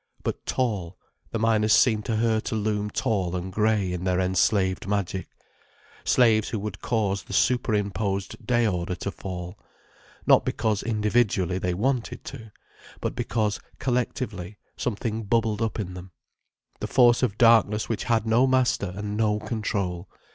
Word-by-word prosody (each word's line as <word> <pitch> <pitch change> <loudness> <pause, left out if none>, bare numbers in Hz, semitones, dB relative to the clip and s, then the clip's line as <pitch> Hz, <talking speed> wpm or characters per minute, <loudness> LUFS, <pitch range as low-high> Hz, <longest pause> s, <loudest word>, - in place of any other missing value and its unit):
But - - -4
tall—the 105 -3 -3
miners 110 -1 +3
seemed 110 -4 +4
to 115 - -1
her 110 0 +2
to 110 - -4
loom 105 -1 -1
tall 95 -4 -1
and 90 +1 -4
grey, 105 -3 +1
in 90 0 -4
their 90 -1 +1
enslaved 95 +1 +1
magic. 100 -2 -2 0.8
Slaves 110 -4 +4
who 115 - -2
would 100 -1 -5
cause 100 -5 0
the - - -10
superimposed 100 -5 0
day 120 -1 +2
order 90 -3 -1
to 100 - -4
fall. 90 +1 -7 0.7
Not - - +6
because, 110 -3 0
individually, 105 -4 +1
they 90 -1 -1
wanted 125 +4 -1
to. 110 -2 -9 0.5
But - - -2
because, 105 -2 -1 0.2
collectively, 115 -6 -2 0.2
something 110 -1 -2
bubbled 110 0 0
up 115 0 -1
in 95 -3 -4
them, 90 0 -10 0.7
the - - -3
force 120 -2 +5
of 110 -5 0
darkness 115 -3 +4
which 115 - -3
had 115 -3 +1
no 115 +4 +4
master 130 -7 +1
and 105 +1 -4
no 105 -1 +2
control. 100 -6 -3
105 Hz, 145 wpm, -25 LUFS, 95-115 Hz, 0.8 s, Not